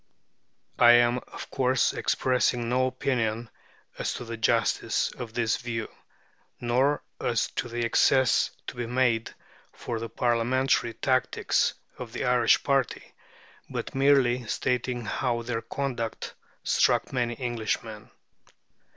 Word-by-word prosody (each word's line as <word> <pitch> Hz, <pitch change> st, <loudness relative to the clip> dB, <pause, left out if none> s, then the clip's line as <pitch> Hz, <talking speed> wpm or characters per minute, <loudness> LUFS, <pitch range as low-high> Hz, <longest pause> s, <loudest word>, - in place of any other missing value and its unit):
(I 120 Hz, 0 st, +8 dB
am, 120 Hz, +1 st, +4 dB
of -, -, -9 dB
course, 130 Hz, -1 st, +2 dB
expressing 125 Hz, -2 st, +1 dB
no 130 Hz, +2 st, +2 dB
opinion 115 Hz, -4 st, -2 dB, 0.5 s
as -, -, -2 dB
to 125 Hz, -, -6 dB
the 115 Hz, 0 st, -5 dB
justice 115 Hz, 0 st, +1 dB
of 120 Hz, -3 st, -8 dB
this 115 Hz, -2 st, +1 dB
view, 115 Hz, -3 st, -4 dB, 0.7 s
nor 130 Hz, +5 st, +1 dB, 0.2 s
as -, -, 0 dB
to 120 Hz, -, -2 dB
the 120 Hz, 0 st, -2 dB
excuses 130 Hz, +1 st, +3 dB, 0.2 s
to -, -, -7 dB
be 120 Hz, -1 st, -4 dB
made 120 Hz, -2 st, 0 dB, 0.4 s
for 115 Hz, -2 st, -5 dB
the 115 Hz, 0 st, -5 dB
Parliamentary 120 Hz, +1 st, +1 dB
tactics 130 Hz, +1 st, +1 dB, 0.2 s
of 120 Hz, -3 st, -7 dB
the -, -, -3 dB
Irish 125 Hz, -2 st, +3 dB
party, 135 Hz, -4 st, -1 dB, 0.6 s
but -, -, -5 dB
merely 135 Hz, -3 st, +3 dB
stating 125 Hz, +1 st, -1 dB
how 120 Hz, +1 st, -1 dB
their 115 Hz, -1 st, -3 dB
conduct 120 Hz, -1 st, -4 dB, 0.3 s
struck -, -, +2 dB
many 120 Hz, -2 st, -1 dB
Englishmen.) 110 Hz, -3 st, -3 dB
120 Hz, 125 wpm, -27 LUFS, 115-130 Hz, 0.7 s, I